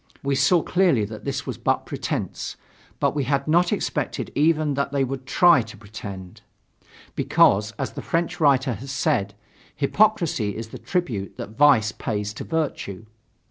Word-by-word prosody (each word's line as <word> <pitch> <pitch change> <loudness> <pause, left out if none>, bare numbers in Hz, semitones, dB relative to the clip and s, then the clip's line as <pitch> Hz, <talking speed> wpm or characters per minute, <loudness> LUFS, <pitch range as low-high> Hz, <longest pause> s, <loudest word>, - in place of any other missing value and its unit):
We 140 0 0
saw 170 +5 +3
clearly 175 - +2
that 110 +1 -9
this 140 0 -3
was 130 -5 -5
but - - 0
pretense; - - -4 0.4
but - - +1
we 145 -3 0
had 140 +2 0
not 175 +3 +3
expected - - -2
even 155 0 +2
that 140 0 -1
they 140 -1 +1
would 135 0 -5
try 170 -1 +5
to 110 -1 -10
pretend; 100 -3 -9 0.7
because, 105 +2 +3
as 135 - -3
the - - -7
French 170 0 -1
writer 135 -4 +3
has 130 +6 -7
said, 100 -6 0 0.4
hypocrisy 160 - +1
is 110 0 -6
the - - -9
tribute 125 - -3
that - - -6
vice 130 -6 +5
pays 105 -3 -3
to - - -7
virtue. 135 - -3
135 Hz, 160 wpm, -23 LUFS, 110-155 Hz, 0.7 s, try